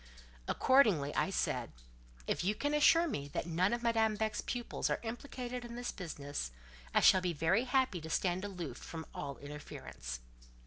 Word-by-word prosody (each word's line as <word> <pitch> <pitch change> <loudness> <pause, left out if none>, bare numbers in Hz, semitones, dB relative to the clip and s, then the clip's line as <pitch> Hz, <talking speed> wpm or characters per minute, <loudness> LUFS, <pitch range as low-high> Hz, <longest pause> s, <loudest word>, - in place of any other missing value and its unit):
Accordingly, 210 - +4
I - - +1
said,—"If - - -3
you 205 +4 +1
can 290 +5 -1
assure 330 +3 +6
me 145 - -3
that - - 0
none 175 +3 +2
of 240 0 -1
Madame 225 -2 +3
Beck's 215 0 -1
pupils 240 -2 -2
are - - +1
implicated 245 +1 -5
in 235 0 -7
this 245 0 -3
business, 145 - -5 0.4
I - - +4
shall 185 - +7
be 180 -1 0
very 170 - +2
happy 255 -9 +1
to 160 - -7
stand 180 +2 +1
aloof 180 -10 -5
from 160 -1 -7
all 140 -1 -5
interference. 65 - -7
185 Hz, 165 wpm, -34 LUFS, 145-240 Hz, 0.4 s, shall